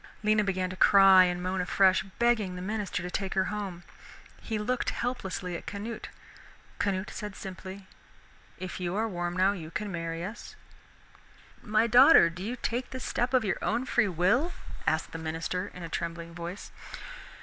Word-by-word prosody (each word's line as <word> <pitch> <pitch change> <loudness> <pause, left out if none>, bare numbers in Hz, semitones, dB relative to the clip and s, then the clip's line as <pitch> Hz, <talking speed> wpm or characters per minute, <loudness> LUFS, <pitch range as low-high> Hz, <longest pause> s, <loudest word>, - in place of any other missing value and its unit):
Lena 215 0 +3
began 185 -2 -1
to - - -6
cry 195 -1 +7
and 180 0 -2
moan 185 0 -1
afresh, 185 +1 +4 0.2
begging 235 -6 +2
the 180 - -6
minister 205 -3 -2
to 180 - -5
take 195 0 -3
her 190 - +3
home. 195 -4 -5 0.6
He 220 - -3
looked 250 +4 -1
helplessly 190 -7 -3
at - - -8
Canute. 210 +3 -5 0.7
Canute 195 -1 -1
said 210 -2 -6
simply, 190 +1 -8 0.7
"If 185 0 -6
you 180 0 -2
are 220 +2 +1
warm 175 -3 -3
now, 190 +2 +4
you 170 -6 -6
can 205 +4 -4
marry 165 -1 -4
us." 210 +4 -8 1.1
"My 215 +1 +2
daughter, 240 - +7
do 180 +2 -9
you 225 +6 -3
take 245 0 -3
this 260 0 -6
step 245 +1 0
of 255 -4 +3
your 190 - -1
own 235 +3 0
free 240 -3 +2
will?" 205 - +2 0.3
asked - - +1
the 165 - -6
minister 165 +4 -3
in 180 - -9
a - - -4
trembling 170 0 -4
voice. 175 +3 -7
190 Hz, 170 wpm, -29 LUFS, 180-215 Hz, 1.1 s, cry